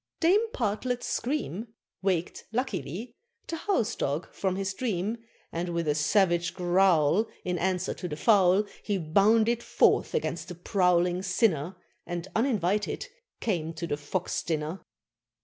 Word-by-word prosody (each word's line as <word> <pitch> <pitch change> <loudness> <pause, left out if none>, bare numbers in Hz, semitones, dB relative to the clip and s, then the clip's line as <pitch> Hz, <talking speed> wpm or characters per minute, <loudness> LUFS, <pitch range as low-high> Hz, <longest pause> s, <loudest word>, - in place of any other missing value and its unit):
Dame 395 +7 +4
Partlet's 245 - -1
scream 235 - -3 0.3
Waked, 185 -3 -1
luckily, 225 - -3 0.3
the 330 - -4
house 320 - 0
dog 145 +5 -2
from 190 -2 -1
his 195 0 -2
dream, 210 -1 -2 0.3
And, 175 +2 -3
with 170 -1 -2
a 150 - +3
savage 175 +3 +2
growl 180 0 +3 0.2
In 180 -1 -1
answer 185 +1 0
to 180 - -6
the 150 - -4
fowl, 195 +2 +4 0.2
He 205 -2 -1
bounded 215 +8 +3
forth - - +2
against 170 - -2
the 180 - -7
prowling 180 -1 +2
sinner, 185 - +1 0.3
And, 175 +1 -4
uninvited, 210 -5 0 0.3
came 165 -7 -1
to 170 - -4
the 145 - -1
Fox 150 +5 -2
Dinner. 160 +2 -3
185 Hz, 135 wpm, -28 LUFS, 170-220 Hz, 0.3 s, Dame